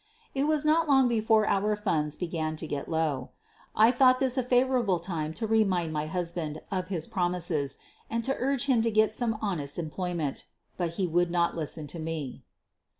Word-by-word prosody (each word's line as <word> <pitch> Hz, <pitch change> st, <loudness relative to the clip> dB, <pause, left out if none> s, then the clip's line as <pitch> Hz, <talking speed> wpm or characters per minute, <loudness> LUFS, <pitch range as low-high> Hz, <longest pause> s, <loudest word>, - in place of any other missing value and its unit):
It 275 Hz, +1 st, +1 dB
was 305 Hz, -1 st, +1 dB
not 315 Hz, +1 st, +3 dB
long 270 Hz, -2 st, +5 dB
before 220 Hz, -2 st, +3 dB
our 210 Hz, +2 st, +2 dB
funds 160 Hz, -8 st, -1 dB
began 160 Hz, -3 st, -3 dB
to 155 Hz, -, -6 dB
get 145 Hz, -2 st, -4 dB
low. 155 Hz, -6 st, -1 dB, 0.5 s
I 220 Hz, +2 st, +6 dB
thought 255 Hz, 0 st, +5 dB
this 260 Hz, -1 st, +1 dB
a 260 Hz, -, +2 dB
favorable 245 Hz, -5 st, +2 dB
time 165 Hz, -3 st, -3 dB
to 225 Hz, -, -2 dB
remind 195 Hz, -7 st, +1 dB
my 150 Hz, 0 st, -2 dB
hus 170 Hz, +1 st, -2 dB
band 155 Hz, -3 st, -4 dB
of 185 Hz, -3 st, -2 dB
his 175 Hz, -5 st, -1 dB
promises 175 Hz, -6 st, -1 dB, 0.3 s
and 230 Hz, 0 st, -1 dB
to 270 Hz, +3 st, 0 dB
urge 270 Hz, 0 st, 0 dB
him 255 Hz, -5 st, +3 dB
to 230 Hz, -, +1 dB
get 215 Hz, 0 st, +3 dB
some 225 Hz, -1 st, -1 dB
honest 150 Hz, -9 st, -2 dB
employment. 170 Hz, -2 st, -3 dB, 0.3 s
But 170 Hz, -2 st, -2 dB
he 185 Hz, +2 st, 0 dB
would 175 Hz, +1 st, +1 dB
not 170 Hz, 0 st, +1 dB
listen 155 Hz, -1 st, -4 dB
to 150 Hz, +4 st, -7 dB
me. 155 Hz, -5 st, -4 dB
180 Hz, 190 wpm, -28 LUFS, 160-230 Hz, 0.5 s, I